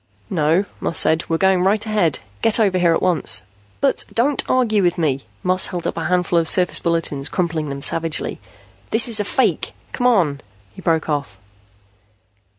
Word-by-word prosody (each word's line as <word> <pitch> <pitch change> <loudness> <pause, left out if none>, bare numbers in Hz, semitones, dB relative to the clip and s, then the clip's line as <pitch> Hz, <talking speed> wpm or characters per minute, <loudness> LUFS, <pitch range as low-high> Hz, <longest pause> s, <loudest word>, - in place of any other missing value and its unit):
"No," 165 +2 +1
Moss 165 - -3
said. 160 +1 +2
"We're 165 - +1
going 190 0 +2
right 205 +3 +1
ahead. 205 -9 0 0.2
Get 225 0 +2
over 195 -4 +2
here 170 -2 +3
at - - -2
once." 175 -5 +3 0.4
"But 275 - +1
" - - -19
"Don't 265 +5 +1
argue 230 -5 +2
with 175 -2 +1
me." 140 -5 -1 0.2
Moss 185 +1 +3
held 175 -2 -6
up - - -2
a 165 - -4
handful 180 0 +1
of 165 - -1
surface 180 +1 +3
bulletins, 165 -4 -2
crumpling 165 -4 -2
them 140 0 -4
savagely. 165 0 0 0.5
"This 225 +2 +5
is 230 -3 +4
a - - +1
fake. 260 +5 -1 0.2
Come 245 - 0
on!" 170 - +1 0.3
He - - -12
broke 165 -2 0
off. 140 -10 -3
175 Hz, 180 wpm, -19 LUFS, 160-205 Hz, 0.5 s, This